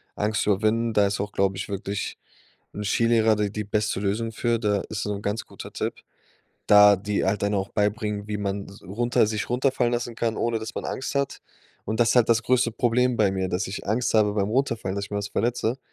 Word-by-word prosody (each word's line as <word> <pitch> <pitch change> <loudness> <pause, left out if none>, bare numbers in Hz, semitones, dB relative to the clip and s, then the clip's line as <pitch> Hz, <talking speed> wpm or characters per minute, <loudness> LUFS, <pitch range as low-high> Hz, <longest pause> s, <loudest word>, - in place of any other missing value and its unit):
Angst 110 +1 0
überwinden. 110 +3 +1
Da 105 -1 +4
ist 100 0 -2
auch, 105 0 -4
glaub 95 -1 +1
ich, 95 - -5
wirklich 100 0 -4 0.6
'n 105 - -5
Skilehrer 115 +1 +3
de 105 -1 0
die 105 +1 -4
beste 105 -1 -1
Lösung 110 +3 -1
für, 115 +1 0
da 105 -3 +1
ist 105 -2 -3
so 105 - -2
'n 100 - -7
ganz 105 +2 -2
guter - - -10
Tipp, - - -3 0.7
da 105 0 +8
die 100 +2 -1
halt 100 +2 0
dann 100 +1 +1
auch 95 -1 -1
beibringen, 105 0 -1
wie 105 - -2
man 100 -1 -3
s 100 - -14
runter 115 +5 +1
sich 105 -1 -3
runterfallen 125 -1 +1
lassen 120 0 -3
kann, 115 -1 -1
ohne 115 -1 0
dass 110 0 -7
man - - -4
Angst 130 - -4
hat. 140 -1 -1 0.5
Und 110 - -2
das 115 - +4
ist - - +2
halt 120 -2 +5
das 115 0 +3
größte 125 -1 +2
Problem 125 +1 +1
bei 105 -3 +3
mir, 95 -1 -1
dass 90 +3 -1
ich 95 - -6
Angst 115 +5 0
habe 105 -2 +3
beim 100 -1 0
runterfallen, 115 -6 0
dass 100 0 -3
ich - - -23
mir 100 - -2
was 100 0 -4
verletze. 120 +3 -1
105 Hz, 230 wpm, -25 LUFS, 100-115 Hz, 0.7 s, da